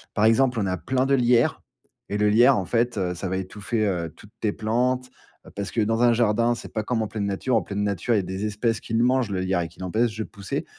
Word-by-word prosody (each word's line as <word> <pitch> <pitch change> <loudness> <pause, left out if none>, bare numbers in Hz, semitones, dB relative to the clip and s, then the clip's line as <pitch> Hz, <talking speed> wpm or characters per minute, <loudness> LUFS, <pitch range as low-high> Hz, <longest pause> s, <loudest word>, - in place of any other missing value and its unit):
Par 105 - +3
exemple, 125 +2 +3
on 100 - 0
a 95 -1 -1
plein 130 +8 0
de 140 - +1
lierre 120 -2 +3 0.5
et 105 - -1
le 105 0 +3
lierre, 120 +5 +6
en 95 - -2
fait, 120 +3 0
heu, 90 -2 -1
ça 90 +1 -5
va 95 - -1
étouffer, 105 +4 -2
heu, 85 -5 -2
toutes 105 - -16
tes 105 - 0
plantes, 125 +4 0 0.4
heu, - - -13
parce 100 0 -4
que, 115 - -1
dans 115 +2 +1
un 120 -1 +5
jardin, 115 +1 +2
c'est - - -10
pas 110 - -1
comme 115 +1 -1
en - - -3
pleine 100 -1 -3
nature. 100 +6 -1
En 115 - +3
pleine 100 +2 -3
nature, 100 +3 0
il - - +3
y - - +3
a - - -8
des 95 +3 -4
espèces 110 +2 -1
qui 115 - -5
le 115 - +3
mangent 125 -2 +2
le 95 -2 -2
lierre 95 -1 0
et 85 - -3
qui 85 - -20
l'empêchent 110 +5 0
de 110 - -2
pousser. 100 -2 -5
110 Hz, 280 wpm, -24 LUFS, 100-120 Hz, 0.5 s, lierre